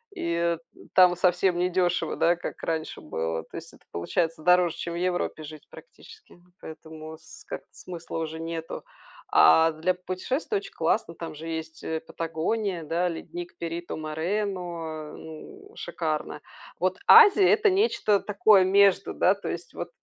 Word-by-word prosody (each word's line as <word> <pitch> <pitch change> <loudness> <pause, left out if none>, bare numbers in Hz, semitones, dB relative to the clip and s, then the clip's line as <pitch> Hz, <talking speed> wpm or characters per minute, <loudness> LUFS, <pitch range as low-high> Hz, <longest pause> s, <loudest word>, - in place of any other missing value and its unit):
и 170 - 0 0.4
там 180 -1 +7
совсем 180 0 +2
не 180 +1 +2
дешево, 180 -1 0
да, 175 +1 +3
как 175 - -7
раньше 160 -1 -3
было. 80 +1 -3
То - - -15
есть, - - -10
это - - -20
получается 165 - -1
дороже, 180 -1 +4
чем 170 - -5
в - - -4
Европе 175 -3 -2
жить 155 0 -11
практически, 440 - -16 0.2
поэтому 160 0 -10
с 160 - -15
как-то - - -7
смысла 170 -2 -8
уже 160 0 -4
нету. 165 0 -5 0.5
А 160 - +6
для 165 +4 0
путешествий 185 - -3
очень 390 0 -7
классно. 170 - 0
Там 165 -1 -7
же 160 +2 -8
есть, 160 -1 -6
э, 160 0 -2
Патагония, 170 +4 -3
да, 170 +3 0
ледник 175 +1 -7
Перито-Морено. 170 0 -4
Ну 395 - -11
шикарно. - - -4 0.4
Вот - - 0
Азия- 410 -4 +8
это 425 0 +4
нечто 375 - +2
такое 205 -1 +4
между, 195 0 +4
да. 190 +2 +3
То 200 - -8
есть, - - -7
вот - - -6
175 Hz, 150 wpm, -26 LUFS, 160-190 Hz, 0.5 s, Азия